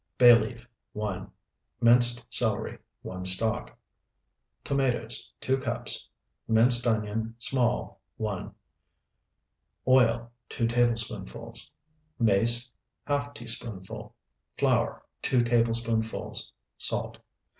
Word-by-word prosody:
Bay 120 -1 +9
leaf, 120 +1 -2 0.3
1. 100 -3 -4 0.5
Minced 120 0 +5
celery, - - +1 0.2
1 95 0 -6
stalk. 100 +5 0 0.9
Tomatoes, 135 -3 -1
2 130 +1 +1
cups. 140 - -3 0.4
Minced 120 +2 +4
onion, 110 0 -1
small, 120 0 -1 0.2
1. 105 -4 -4 1.4
Oil, 120 -2 +4 0.2
2 115 - -1
tablespoonfuls. 120 -1 -1 0.4
Mace, 120 +3 +2 0.4
½ 145 0 -1
teaspoonful. 115 -6 -6 0.4
Flour, - - +1 0.2
2 125 -2 +3
tablespoonfuls. 115 -1 0 0.3
Salt. - - 0
115 Hz, 80 wpm, -28 LUFS, 110-120 Hz, 1.4 s, Bay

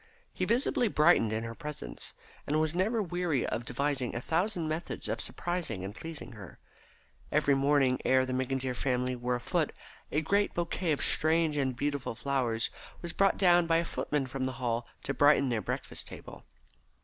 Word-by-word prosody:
He - - -1
visibly 245 0 +2
brightened 155 - +4
in 110 +1 -1
her 115 0 -5
presence, 150 +5 -7 0.3
and 150 +2 +2
was 155 0 +1
never 210 +5 +1
weary 175 -7 0
of 120 - -3
devising 130 0 -1
a - - -1
thousand 170 - 0
methods 155 +2 -4
of - - -2
surprising 175 - -3
and 100 - -6
pleasing 160 +1 -8
her. 100 -7 -11 0.7
Every 145 - +3
morning 135 -2 +3
ere 130 0 +4
the 130 - -3
McIntyre 130 0 -1
family 125 0 0
were 125 0 -1
afoot 120 - 0 0.4
a 150 - +2
great 200 +5 +1
bouquet 170 0 -1
of 145 - +1
strange 160 -1 +3
and 135 -3 0
beautiful 140 -3 -2
flowers 120 -4 -1 0.3
was 170 - -4
brought 195 0 +3
down 175 -3 +5
by 165 0 +4
a 170 - +1
footman 150 -3 -1
from 130 0 -3
the 130 - -2
Hall 120 -1 -2 0.2
to - - -2
brighten 145 -2 +5
their 115 -3 0
breakfast - - -4
table. - - -10
140 Hz, 175 wpm, -30 LUFS, 125-165 Hz, 0.7 s, down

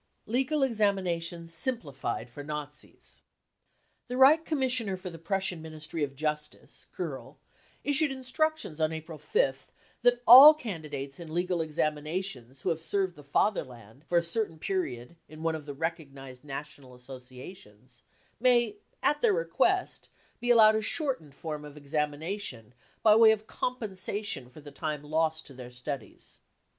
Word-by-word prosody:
Legal 265 +6 +1
Examinations 180 -8 0
simplified 155 - -2
for 135 +4 -9
Nazis. 150 0 -9 0.9
The 250 0 -4
Reich 300 +5 +6
Commissioner 250 -9 0
for 185 0 -7
the 165 - -10
Prussian 185 0 -2
Ministry 155 0 -5
of 140 -1 -3
Justice, 150 +1 -4
Kerl, - - -6 0.5
issued 290 +1 +2
instructions 265 - -1
on 155 0 +2
April 160 0 -7
5th 485 - 0 0.3
that 245 0 +3
all 275 +6 +11
candidates 150 - -6
in 165 -2 -9
legal 175 +1 0
examinations 150 -3 -3
who - - -1
have 165 -1 -1
served 190 +1 0
the 150 - -12
Fatherland 130 - -2
for 175 +2 0
a 170 - +3
certain 170 -1 -1
period 155 -6 -3
in 155 +1 -10
one 165 0 +1
of 155 -2 -7
the 145 - -5
recognised 140 -5 -5
national 140 -2 -8
associations 125 - -13 0.4
may, 245 - +3 0.3
at 295 - +2
their 460 -4 +4
request, - - 0 0.3
be 245 0 -2
allowed 220 -2 +7
a 220 - +1
shortened 215 - -2
form 150 -1 -6
of 150 0 -11
examination 150 - -3 0.3
by 215 -1 +7
way 225 0 +8
of 215 0 -1
compensation 205 - -4
for 150 - -14
the 145 0 -11
time 150 +1 -4
lost 160 +1 0
to 140 - -9
their 125 -1 -9
studies. 125 0 -8
165 Hz, 145 wpm, -29 LUFS, 145-215 Hz, 0.9 s, all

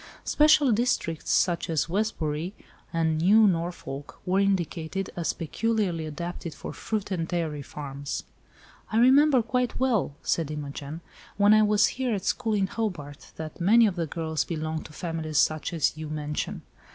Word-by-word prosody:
Special 300 -3 +5
districts, 210 -8 0
such 175 -2 +2
as 160 -1 +1
Westbury 175 -3 -2 0.4
and 160 -2 +1
New 210 +6 +6
Norfolk, 165 -6 -2
were 185 +1 +2
indicated 190 -2 -1
as 170 -2 0
peculiarly 180 -2 -1
adapted 170 +1 -6
for - - -7
fruit 210 -2 -3
and 165 -3 -1
dairy 160 -5 -2
farms." 140 0 -6 0.7
"I 220 - +1
remember 265 +2 +6
quite 250 +2 -1
well," 230 - +1
said 165 -3 0
Imogen, 150 +1 -6 0.4
"when 205 +1 +6
I 215 - +6
was 210 0 +4 0.2
here 245 -4 +1
at 195 - -5
school 225 -4 0
in 195 -2 +2
Hobart, 175 -10 -5
that 160 +2 -7
many 225 +6 +6
of 200 -4 +1
the 170 -3 -2
girls 160 -1 -2
belonged 160 -1 -4
to - - -16
families 160 -2 -3
such 155 +4 +2
as 165 -4 +1
you 155 -1 -6
mention. 150 -1 -4
170 Hz, 155 wpm, -27 LUFS, 155-215 Hz, 0.7 s, New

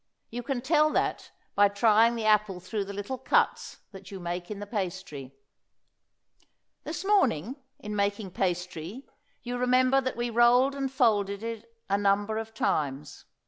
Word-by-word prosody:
You 240 +2 -4
can 260 0 -3
tell 305 +3 +3
that - - -1 0.2
by 205 0 +5
trying 220 +3 +4
the 225 -2 -3
apple 210 -3 +2
through 200 +3 -4
the 200 - -7
little 205 +6 -5
cuts 265 - 0
that 195 -1 -12
you 195 - -7
make 175 0 -5
in 210 - -5
the 205 - -6
pastry. 170 - -5 1.5
This - - -5
morning, 265 - +2 0.2
in 210 0 -6
making 200 -1 -1
pastry, 180 - -3 0.4
you 245 0 -4
remember 255 +2 +3
that 260 -2 -3
we 240 0 -2
rolled 245 +4 +4
and 275 -1 -3
folded 210 -6 +1
it 230 0 -6 0.2
a 200 0 +1
number 205 +2 +1
of 225 0 -6
times. 145 0 -2
210 Hz, 155 wpm, -28 LUFS, 195-245 Hz, 1.5 s, by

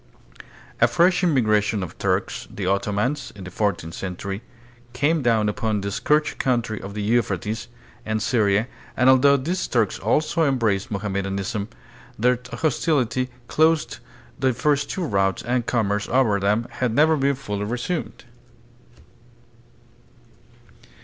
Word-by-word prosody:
A - - +6
fresh 180 +2 +3
immigration 110 - +2
of 90 - -7
Turks, - - -1
the 100 - -5
Ottomans, 105 +8 -1
in 100 - -9
the 90 - -8
fourteenth 85 -5 -1
century 95 +2 -5 0.5
came 145 +5 +1
down 115 -4 +2
upon 105 0 -1
the 100 0 -3
scourged 150 +8 +1
country 120 -4 0
of 100 +1 -8
the 105 - -3
Euphrates 110 -1 -1 0.4
and 110 -1 -1
Syria, 110 -1 +2 0.3
and 130 +1 +6
although 140 +2 +5
these 170 +7 -2
Turks 115 -5 0
also 155 - +1
embraced 115 -6 +1
Moham 100 -1 -3
medanism, 100 +1 -2 0.5
their 125 +2 +2
hostility 130 -2 0 0.2
closed 160 0 +2 0.4
the 130 -2 +2
first 145 +3 +1
two 190 - -3
routes 95 - 0
and 120 0 -1
commerce 105 -3 0
over 115 -5 +3
them 105 +4 +1
has 125 - +2
never 155 +7 +4
been 140 -1 +1
fully 105 -6 -4
resumed. 125 +10 -4
115 Hz, 130 wpm, -23 LUFS, 100-135 Hz, 0.5 s, A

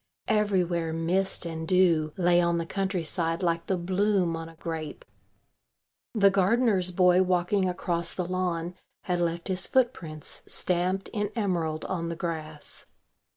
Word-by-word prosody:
Everywhere 185 -7 +1
mist 175 +4 +1
and 160 -1 -5
dew 170 -4 +3
lay 175 -1 +4
on 170 0 +1
the 165 - -2
countryside 175 -2 -1
like 170 -1 0
the 190 - +1
bloom 185 0 +1
on 165 0 -6
a 165 - -15
grape. 160 -2 -6 1.1
The 200 -2 +5
gardener's 195 -1 +2
boy 180 0 +5
walking 185 +1 +1
across 170 -1 0
the 180 - -2
lawn 180 -1 -2 0.3
had 180 -1 -1
left 170 0 -1
his 185 -1 0
footprints 175 - -1
stamped 185 +2 -1
in 205 -2 -2
emerald 170 -8 -1
on 170 -3 -2
the 170 - -3
grass. 155 -3 -5
175 Hz, 140 wpm, -27 LUFS, 165-190 Hz, 1.1 s, The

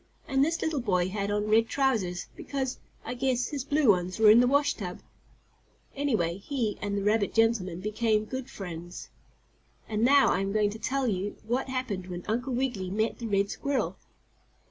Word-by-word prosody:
And 270 0 +3
this 330 +3 0
little 315 -3 0
boy 185 -6 +1
had 200 +1 -2
on 210 0 0
red 225 +1 +4
trousers, 220 -11 0
because, 265 -2 -3 0.3
I - - -3
guess, 250 -1 0
his 285 -4 -3
blue 290 -2 +2
ones 180 -2 +2
were 220 -1 +7
in 225 - +7
the 245 - +5
washtub. 270 -10 0 0.9
Anyhow, 215 -12 0
he 240 -4 -2
and 205 -1 -2
the 200 - -1
rabbit 210 0 +1
gentleman 215 -6 +2
became 215 +1 +1
good 260 +3 -5
friends. 175 -2 -8 0.8
And 215 0 -1
now 275 +3 +6
I - - +1
am 195 0 -2
going 210 -1 +2
to 220 - -8
tell 270 +3 -1
you 205 -3 -1
what 250 +4 -1
happened 235 -8 -3
when 175 -1 -6
Uncle 245 +5 -1
Wiggily 240 -8 -1
met 215 +4 -1
the 235 - -4
red 200 -1 +1
squirrel. 280 -2 -1
220 Hz, 180 wpm, -28 LUFS, 200-260 Hz, 0.9 s, were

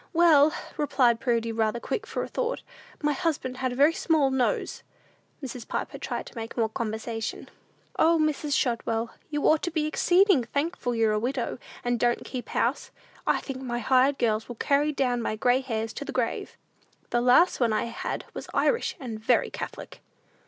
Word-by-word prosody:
"Well," 315 -3 +6 0.3
replied 255 -5 +3
Prudy, 230 -3 0
rather 225 0 0
quick 445 - -3
for - - -3
a - - -5
thought, - - -2 0.4
"my 295 0 +2
husband 295 -7 -2
had 260 -1 -1
a - - -4
very 290 +5 +5
small 310 -5 +2
nose!" 260 -2 0 0.6
Mrs. 250 -2 -6
Piper - - -4
tried - - -4
to - - -13
make 225 +1 -6
more 225 -2 +2
"conversation." 225 +1 -4 0.5
"O, 330 +1 +5
Mrs. 305 -2 +1
Shotwell, 230 -2 -1 0.2
you 295 -1 -2
ought 310 -1 +4
to - - -1
be 315 -2 -1
exceeding 350 - +4
thankful 280 0 -2
you're 225 -1 +3
a 215 - +1
widow, 245 +1 -2 0.2
and 245 -1 0
don't 240 +1 +1
keep 255 -2 -6
house! - - 0 0.4
I - - +2
think 265 -2 -6
my 240 -2 -3
hired 260 +4 +3
girls 220 -2 0
will 240 - -7
carry 285 +5 +2
down 250 -4 0
my 215 - -2
gray 245 +4 +2
hairs 225 -4 -3
to - - -5
the - - -6
grave! 245 -3 -2 0.5
The 240 - +2
last 255 +9 +5
one 235 -3 +2
I 215 - +1
had 235 - -4
was - - -7
Irish, 480 -1 +1
and 230 -5 -6
very 215 - +2
Catholic." - - -7
255 Hz, 180 wpm, -27 LUFS, 230-295 Hz, 0.6 s, Well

